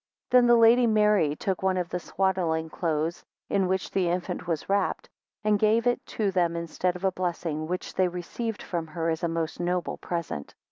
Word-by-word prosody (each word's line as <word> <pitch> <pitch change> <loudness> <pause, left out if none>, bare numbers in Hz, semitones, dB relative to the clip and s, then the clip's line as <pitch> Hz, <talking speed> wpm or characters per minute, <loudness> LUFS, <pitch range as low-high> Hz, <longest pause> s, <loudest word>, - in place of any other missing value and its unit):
2 250 - +7
Then 245 -1 +6
the 240 - +7
Lady 235 +1 +6
Mary 210 -8 +3
took 190 +3 -2
one 190 -1 +1
of 180 -1 -2
his 180 - -2
swaddling 170 -4 0
clothes 160 0 -1 0.3
in 195 -2 +2
which 190 +1 -1
the 185 -3 +1
infant 175 0 -3
was 165 -3 -2
wrapped, 200 -1 0 0.4
and 210 -1 +3
gave 220 +2 +3
it 245 0 +1
to 205 -3 -1
them 175 -2 +1
instead 170 +2 -1
of 180 - -8
a 190 - +3
blessing, 170 -4 -3
which 180 +2 -4
they 185 - +2
received 190 +6 -4
from 170 -3 -3
her 165 +1 -2
as 160 - -3
a 170 - +1
most 165 -1 -3
noble 175 0 -1
present. 170 - -5
180 Hz, 200 wpm, -27 LUFS, 170-200 Hz, 0.4 s, 2